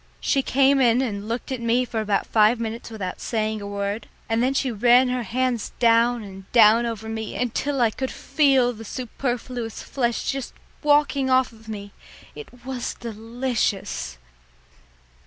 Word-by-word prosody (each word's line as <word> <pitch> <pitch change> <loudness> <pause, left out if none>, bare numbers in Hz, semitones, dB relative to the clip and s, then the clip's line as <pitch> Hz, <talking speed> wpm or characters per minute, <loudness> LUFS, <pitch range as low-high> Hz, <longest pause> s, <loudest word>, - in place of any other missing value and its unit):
She 275 - +1
came 275 +1 +3
in 240 -1 +4
and 205 -4 -4
looked 235 +4 -4
at 255 -2 -3
me 235 +2 +2
for 225 -2 -3
about 205 -2 0
five 220 +2 +3
minutes 230 0 -5
without 200 -5 -5
saying 215 -2 -1
a 200 - -6
word, 200 +2 -3 0.2
and 225 0 +1
then 260 +2 +1
she 270 -2 +1
ran 245 +3 +4
her 250 0 -1
hands 240 +1 -1
down 235 0 +3
and 195 -1 -11
down 230 0 +6
over 220 -1 -5
me 220 -1 -5
until 260 +3 -1
I 230 -2 +4
could 260 +3 -3
feel 270 -5 +2
the 225 0 -10
superfluous 245 -1 -4
flesh 240 -4 -1
just 270 -1 -6 0.3
walking 290 -2 +3
off 260 0 +3
of 225 -1 -18
me. 205 -2 -7 0.4
It 250 - -12
was 260 -2 -4
delicious! 225 - -3
235 Hz, 160 wpm, -23 LUFS, 220-255 Hz, 0.4 s, down